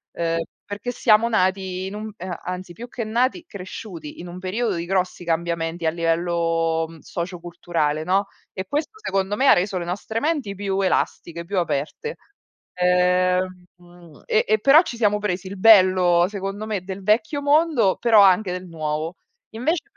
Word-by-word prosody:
Ehm, 165 0 0 0.3
perché 205 +4 -5
siamo 230 -1 +3
nati 190 -3 0
in 190 - -6
un 215 +1 -6
ehm, 185 -1 -5
anzi, 180 0 -6
più 235 +6 -9
che 240 0 -5
nati, 250 +10 0
cresciuti 185 - -9
in 175 - -8
un 175 +1 -8
periodo 200 +3 -1
di 170 0 -3
grossi 185 -1 -1
cambiamenti 170 0 -2
a 160 - +3
livello, 165 -1 0
mhmm, 165 -1 -13
socioculturale, 170 -3 -3
no, 195 +4 +1 0.3
e 190 - -5
questo 305 - -3
secondo 195 - -1
me 265 +5 +2
ha - - +9
reso 185 +1 0
le 175 - -3
nostre 205 +5 -3
menti 290 -9 -1
più 195 0 -2
elastiche, 170 -2 -1
più 195 +2 -1
aperte. 170 - -3 0.6
Ehm, 180 0 +2
mhmm, 175 -3 -18
e 215 - +2
e 215 +1 +3
però 275 +8 +7
ci 245 -9 -6
siamo 210 -2 +2
presi 190 -2 -2
il 200 +1 -7
bello 185 -4 +6
secondo 200 +1 -5
me 210 -4 -3
del 190 +1 -7
vecchio 215 +8 +1
mondo, 285 - +3
però 225 -3 +6
anche 190 0 +4
del 180 0 -5
nuovo. 160 +1 -4 0.3
Invece, 295 +10 -1
185 Hz, 170 wpm, -22 LUFS, 175-215 Hz, 0.6 s, ha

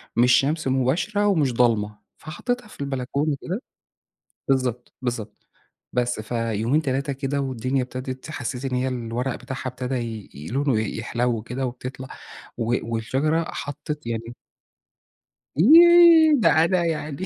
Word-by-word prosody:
مش 120 +1 +5
شمس 150 +2 +2
مُباشرة، 150 - +1
ومش 155 -10 +2
ضلمة، 110 -3 +1 0.2
فحطّيتها 245 +10 -4
في 210 - -12
البلكونة 140 +2 -1
كده، 190 +7 -4 0.9
بالضبط، 125 -3 -1
بالضبط، 120 -4 -5 0.5
بس 125 -2 0
فيومين، 115 +4 0
3 140 0 -1
كده 135 +1 -2
والدُنيا 130 0 -1
ابتدت 130 +2 -7
حسَّيت 125 -2 -4
إن 130 -1 -1
هي 130 +1 0
الورق 125 0 -3
بتاعها 130 0 -6
أبتدى 130 +1 -4 0.4
ي 75 +3 -9
لونُه 135 -3 +1
يحلو 115 +2 -2
كده 125 +4 -4
وبتطلع، 130 +1 -6 0.5
و 120 0 0 0.2
والشجرة 140 +9 0
حطّت 145 -1 -6
يعني 115 +1 -4 1.2
ييه، 330 - +8
ده 165 - +5 0.2
أنا 175 0 +1
يعني 155 0 -3
130 Hz, 125 wpm, -23 LUFS, 120-150 Hz, 1.2 s, ييه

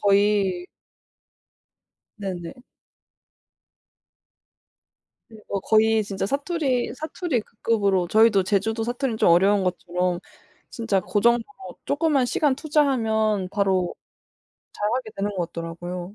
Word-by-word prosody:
거의 200 -3 +2 1.5
네네. 190 +2 -6 2.7
네. 220 -2 -14
어 200 - -1
거의 220 +1 +3
진짜 195 -1 -3
사투리 280 - -1
사투리 315 - -2
그 215 - -20
급으로 200 -5 +2
저희도 215 -1 +5
제주도 215 +4 0
사투리는 245 -1 -2
좀 175 - +4
어려운 195 +3 +4
것처럼 180 0 -1 0.5
진짜 225 -5 0
고 205 +3 -1
정도로 240 - 0
쪼끔만 285 -4 +2
시간 285 +1 +1
투자하면 225 - +1
바로 190 -3 0 0.8
잘하게 220 +2 -2
되는 200 +1 -1
것 175 -2 -1
같더라고요. 175 +3 -6
210 Hz, 240 characters per minute, -24 LUFS, 190-240 Hz, 2.7 s, 저희도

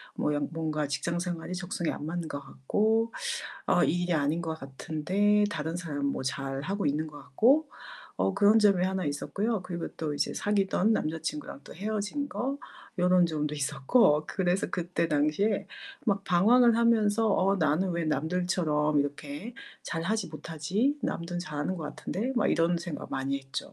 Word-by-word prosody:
뭐 150 - 0
연 145 -1 -1
뭔가 155 -2 -2
직장 170 +5 -2
생활이 175 0 -4
적성에 175 -2 -2
안 145 - -6
맞는 170 +1 -3
것 145 - -4
같고 215 - 0 0.5
어 - - +4
이 175 - +1
일이 175 - 0
아닌 155 +2 +1
것 160 -1 -4
같은데 180 +10 +1
다른 160 -1 -3
사람 145 -5 -3
뭐 140 - -1
잘하고 135 +9 -2
있는 150 +2 0
것 150 -1 -10
같고 275 - +3 0.5
어 195 - +1
그런 205 +2 +5
점이 200 -4 +4
하나 190 0 -1
있었고요. 200 +9 -1
그리고 175 -2 -4
또 155 -2 -2
이제 145 - -1
사귀던 205 +1 +2
남자친구랑 155 -6 -3
또 - - -11
헤어진 215 - -2
거 275 +2 -3 0.4
요런 180 0 +5
점도 150 -2 -2
있었고. 150 - +3
그래서 185 -1 0
그때 175 -1 -1
당시에 155 +8 +1 0.4
막 200 -4 +1
방황을 225 +6 +5
하면서 225 -2 +3
'어 195 +1 +3
나는 165 +2 +1
왜 170 -1 -1
남들처럼 155 -1 +1
이렇게 145 +9 -5 0.3
잘하지 180 +4 -1
못하지? 165 - -1
남들은 175 +1 -2
잘하는 150 +1 -3
것 160 - -5
같은데?' 235 +8 -3
막 235 - +3
이런 170 +1 +2
생각 170 -2 -6
많이 135 +1 -1
했죠. 135 0 -6
175 Hz, 325 characters per minute, -29 LUFS, 150-200 Hz, 0.5 s, 그런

